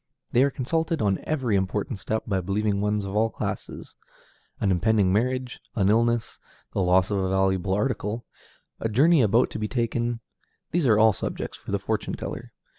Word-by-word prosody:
They 120 - +4
are 140 - +4
consulted 160 +5 -1
on 100 -5 +1
every 130 -9 0
important 100 +3 -1
step 110 +2 -2
by 95 -3 0
believing 100 +2 0
ones 105 0 0
of 100 +1 -5
all 110 +1 +3
classes. - - -6 0.6
An 100 - +1
impending 95 +1 +2
marriage, 125 +3 -1 0.2
an 100 -4 +2
illness, 115 +1 +1 0.3
the - - 0
loss 90 +1 +3
of 100 - +1
any 95 -1 0
valuable 95 0 +1
article, 115 0 -1 0.5
a 115 - -1
journey 145 +8 +5
about 115 +2 +3
to - - -5
be 105 - -1
taken, 120 0 -1 0.5
these 170 -5 +1
are 110 -3 +5
all 110 0 +6
subjects - - -4
for - - -9
the - - +2
fortune - - -2
teller. - - -7
110 Hz, 180 wpm, -25 LUFS, 100-120 Hz, 0.6 s, all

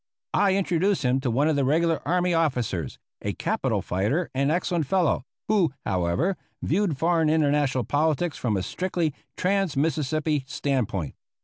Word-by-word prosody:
I 195 -2 +3
introduced 190 -1 +1
him 125 +1 +2
to 130 -2 -1
one 135 +6 +2
of 160 - +2
the 140 - +1
regular 165 +4 +2
army 180 0 +2
officers, 125 - -1 0.2
a - - -2
capital - - -1
fighter 110 - -1
and 140 +2 +1
excellent 170 -2 0
fellow, 175 -7 +1 0.2
who, 185 -10 +2
however, 95 - 0 0.3
viewed 180 -3 +1
foreign 165 0 +2
international 145 -4 +2
politics 155 +5 0
from 110 -5 0
a 95 - -2
strictly 175 - -1 0.2
trans 190 -4 0
Mississippi 155 0 0
stand 135 -4 0
point. 90 -10 -4
155 Hz, 150 wpm, -25 LUFS, 130-175 Hz, 0.3 s, I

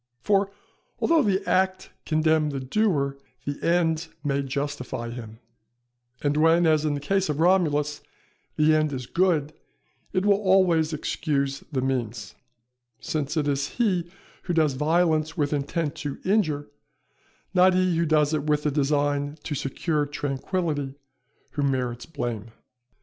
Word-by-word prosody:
For 200 -1 +2 0.5
although 330 -2 +3
the 200 -4 0
act 190 0 +1 0.2
condemn 155 -1 +2
the 140 -2 -3
doer, 140 -2 0 0.3
the 145 0 -4
end 165 -1 +2 0.2
may 140 -1 0
justify 135 -3 -4
him; 115 -2 -8 0.9
and 145 0 +1
when, 165 +2 +4
as 155 -1 +3
in 150 -1 +1
the - - -3
case 190 +5 0
of 150 0 -1
Romulus, 155 -5 +2 0.5
the 155 +1 +4
end 155 -1 +2
is 130 -2 -4
good, 160 -1 +1 0.6
it 185 +1 0
will 200 0 +4
always 185 -5 +3
excuse 140 -2 -1
the 130 -3 -1
means; 120 -7 -2 0.7
since 150 0 -3
it 150 -2 +1
is 140 0 0
he 185 -8 +1 0.4
who 175 - -1
does 155 -4 +3
violence 155 +2 +1
with 145 -1 0
intent 145 +2 -1
to 145 -2 -4
injure, 155 - +1 0.8
not 185 0 +5
he 185 -1 +2
who 165 0 +1
does 150 -1 +3
it 150 -1 -1
with 150 -1 +1
the 150 - +1
design 145 0 0
to 155 - -4
secure 145 +2 -1
tranquility, 145 0 -2 0.6
who 145 - -3
merits 125 -4 -1
blame. 120 -9 -4
150 Hz, 145 wpm, -25 LUFS, 140-170 Hz, 0.9 s, not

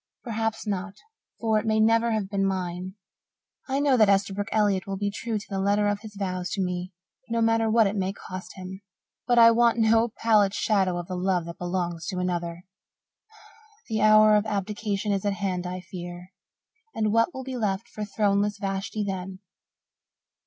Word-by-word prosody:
Perhaps 225 -2 -2
not, 200 -1 -3 0.4
for 220 -2 +2
it - - -6
may 220 0 +2
never 230 +1 +4
have 215 -3 -1
been 195 0 -1
mine. 185 -1 -3 0.7
I 270 +1 +1
know 285 -3 +3
that 215 -3 +5
Esterbrook 200 +1 +1
Elliott 205 -3 +1
will 195 0 -3
be 205 +1 -1
true 225 +1 -3
to 210 - -7
the 195 -1 -3
letter 205 +1 +2
of 205 0 0
his 210 -1 -11
vows 185 -2 -3
to - - -3
me, 180 0 -3 0.4
no 230 0 0
matter 225 0 +2
what 225 0 +4
it 200 +1 -1
may 190 -1 -1
cost 185 -1 -9
him. 190 0 -8 0.5
But 245 -1 +3
I 230 0 +9
want 235 0 +3
no 225 +1 +3
pallid 210 -3 +3
shadow 190 -5 +1
of 175 - -4
the 185 - -5
love 180 -1 0
that 170 0 -9
belongs 175 -2 -3
to 185 - -3
another. 175 -1 -3 1.3
The 220 -1 -1
hour 215 0 +6
of 210 +1 +2
abdication 210 0 -2
is 195 -1 0
at 205 -1 +1
hand, 185 -3 -2
I 180 0 -5
fear. 175 0 -9 0.6
And 215 -1 0
what 230 +7 +3
will 260 - -7
be 260 0 -5
left 210 -1 -1
for 215 - -6
throneless 205 0 +1
Vashti 195 +2 -3
then?" 190 -1 -4
200 Hz, 185 wpm, -26 LUFS, 185-220 Hz, 1.3 s, I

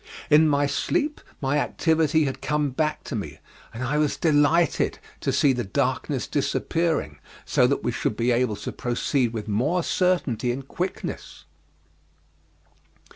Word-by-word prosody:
In 155 +2 +7
my 145 0 +2
sleep 290 - -1 0.2
my 140 +2 +1
activity 160 0 +2
had 135 -2 -3
come 150 -2 0
back 155 +4 -1
to 140 - -5
me, 75 -9 -5 0.3
and 115 +3 -6
I 145 +4 0
was 150 -2 +1
delighted 155 +1 +2 0.2
to - - -1
see 140 -2 +3
the 120 -1 -2
darkness 95 - -1
disappearing, 160 - -1 0.3
so - - +3
that - - -1
we - - 0
should - - -2
be 120 +2 +2
able 120 -2 +1
to - - -6
proceed 120 0 0
with 110 -2 -5
more 135 - +1
certainty 145 - +1
and 135 +2 -6
quickness. 180 +5 -5
145 Hz, 145 wpm, -25 LUFS, 120-160 Hz, 0.3 s, In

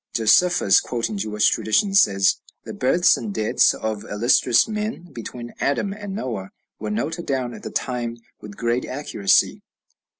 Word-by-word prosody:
Josephus, 115 - +4
quoting 115 -3 -3
Jewish 105 +1 +1
traditions, 195 - +3
says, 95 -1 +2 0.3
"The - - -8
births 170 +8 +3
and 215 - -5
deaths 110 - +2
of 110 -2 -4
illustrious 120 +3 +3
men, 215 -5 -5
between 120 0 -8
Adam 195 +8 0
and 205 -2 -7
Noah, 110 - -4 0.3
were 105 - -4
noted 155 +11 -3
down 130 -3 -2
at - - -10
the - - -6
time 120 -2 -3 0.2
with 105 -1 -11
great 120 +1 -1
accuracy." 105 -8 +1
120 Hz, 145 wpm, -22 LUFS, 105-170 Hz, 0.3 s, Josephus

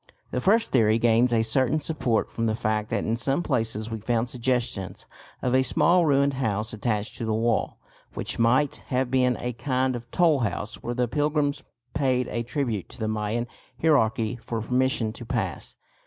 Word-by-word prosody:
The 125 - -1
first 220 - +3
theory 110 -3 +4
gains 115 +1 +3
a 115 -1 +3
certain 130 +6 +2
support 140 -7 -1
from 115 0 -1
the 110 - 0
fact 110 -1 -1
that - - -1
in 115 - 0
some 135 +7 -1
places 110 -3 -2
we 110 - -3
found 120 +1 0
suggestions 120 -7 -2 0.4
of 125 - +1
a 130 - +5
small 170 +5 +3
ruined 140 0 +3
house 110 -3 -2
attached 105 0 -2
to 115 - -2
the 110 -1 0
wall, 115 0 0 0.4
which - - -4
might 130 +5 +3
have 130 -1 0
been 125 -2 +2
a 125 0 -3
kind 130 +2 0
of 120 0 -8
tollhouse 120 - +1
where 120 - -4
the 125 0 +1
pilgrims 145 +1 0 0.3
paid 130 -3 +1
a 120 - -2
tribute 120 - -3
to - - -10
the 110 - -1
Mayan 110 +2 -1 0.3
hierarchy 115 -7 +2
for 115 0 -4
permission 125 -1 0
to - - -9
pass. - - -3
120 Hz, 180 wpm, -25 LUFS, 110-130 Hz, 0.4 s, a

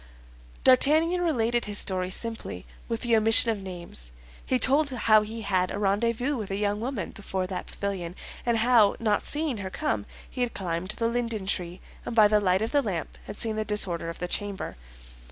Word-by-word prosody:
D'Artagnan 315 +7 +4
related 240 -8 +1
his 205 -1 -1
story 185 -2 +2
simply, 225 +4 -4 0.2
with 230 -1 -3
the 235 -2 +2
omission 225 +1 +6
of 215 - -3
names. 175 - -6 0.3
He 255 - +1
told 280 +4 +4
how 220 -4 +4
he 220 +2 -5
had 185 -2 +1
a - - -4
rendezvous 230 +7 0
with 215 -4 -5
a 195 - -2
young 205 +1 -1
woman 235 -6 -4
before 190 -2 -4
that 185 0 -5
pavilion, 185 -4 -4 0.3
and 235 -1 +1
how, 225 -3 +4
not 215 -3 +1
seeing 295 -5 -1
her 190 -2 -5
come, 110 - -2 0.2
he 250 - -6
had 245 -1 -1
climbed 175 -1 -3
the 230 +2 0
linden 230 -4 -2
tree, 180 -2 -3 0.2
and 235 - -5
by 215 -2 +7
the 210 0 +3
light 190 +1 +2
of 225 - -3
the 290 - +3
lamp 190 - -4
had 205 - -7
seen 220 -2 -1
the 215 - 0
disorder 185 -5 +2
of 165 - -7
the 180 - -3
chamber. 200 +1 -3
215 Hz, 195 wpm, -26 LUFS, 190-235 Hz, 0.3 s, by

